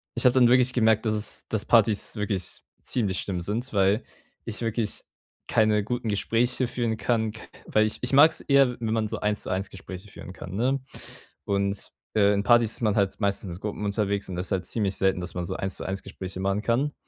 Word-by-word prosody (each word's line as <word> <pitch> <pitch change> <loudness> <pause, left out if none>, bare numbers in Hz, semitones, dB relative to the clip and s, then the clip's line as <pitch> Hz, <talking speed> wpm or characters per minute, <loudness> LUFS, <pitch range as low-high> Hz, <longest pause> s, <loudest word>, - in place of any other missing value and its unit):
ich - - -1
habe 125 - +6
dann 125 -2 +6
wirklich 125 0 +4
gemerkt, 110 -2 +3
dass 110 - +2
es 105 0 -1
dass 110 -2 -1
Partys 110 -1 +3
wirklich 100 -4 -3 0.2
ziemlich 100 -7 -1
schlimm 90 -3 -3
sind, 110 +7 -4
weil 100 +4 +3 0.4
ich 115 -1 -5
wirklich 115 -2 -2 0.4
keine 110 -1 +3
guten 120 +1 -3
Gespräche 120 +4 +1
führen 120 -2 -1
kann, 110 -2 0
k 110 - -10 0.3
weil 110 0 +3
ich - - -2
ich 125 +2 -1
mag‘s 155 +4 +6
eher, 135 -4 +3
wenn 110 -1 -1
man 110 -1 0
so - - -4
1 105 0 -1
zu - - -6
1 95 +1 -2
Gespräche 95 +2 -9
führen 90 - -10
kann, 95 0 -8
ne? 130 +6 +1 0.7
Und, 100 0 -1 0.2
äh, 100 -1 +4
in 100 - 0
Partys 115 0 +4
ist - - -9
man 105 -2 +2
halt 100 -2 0
meistens 100 -2 0
mit 85 - -7
Gruppen 105 0 -4
unterwegs, 100 -1 -1
und 90 - -4
das 90 +1 -3
ist - - -4
halt 90 -2 -1
ziemlich 100 -4 -1
selten, 95 -2 +1
dass 90 - -6
man 90 -1 -2
so - - -4
1 95 -1 -3
zu - - -6
1 95 +1 -3
Gespräche 95 0 -7
machen 100 +1 0
kann. 130 +6 0
105 Hz, 220 wpm, -26 LUFS, 100-120 Hz, 0.7 s, habe